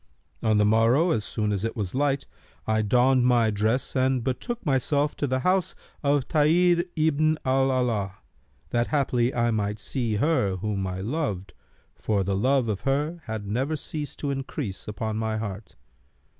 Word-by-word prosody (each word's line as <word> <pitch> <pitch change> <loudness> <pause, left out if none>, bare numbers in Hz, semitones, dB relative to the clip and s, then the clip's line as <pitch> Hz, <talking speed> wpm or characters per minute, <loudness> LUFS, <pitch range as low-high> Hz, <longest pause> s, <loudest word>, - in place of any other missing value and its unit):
On 110 -2 +2
the 105 - +4
morrow, 115 +10 +4
as 110 - 0
soon 105 0 -2
as 100 -1 -2
it 115 - -2
was 100 -6 -3
light, 140 0 0 0.4
I 110 0 +1
donned 125 +4 +3
my 120 -3 +3
dress 110 +7 -1
and 130 -1 +2
betook 225 - -3
myself 145 +1 +1
to 145 - -1
the 130 0 0
house 185 +2 +1 0.3
of 140 -2 +1
Tahir 170 +3 +3
ibn 155 0 +2
al 135 +1 +3
Alaa, 115 -7 0 0.6
that 120 0 +1
haply 130 -4 +1
I 120 -2 +1
might 105 -1 -1
see 115 +1 -2
her 125 - +1
whom 95 0 -2
I 90 0 -4
loved, 100 - -3 0.4
for 100 -3 -1
the 100 +1 -1
love 130 +4 +2
of 105 -3 -2
her 150 +5 -1
had 110 -2 -5
never 130 +9 -1
ceased 150 -1 -5
to 145 - -1
increase 135 -6 -5
upon 110 +1 -3
my 110 0 -1
heart. 105 -2 -6
125 Hz, 170 wpm, -26 LUFS, 105-145 Hz, 0.6 s, the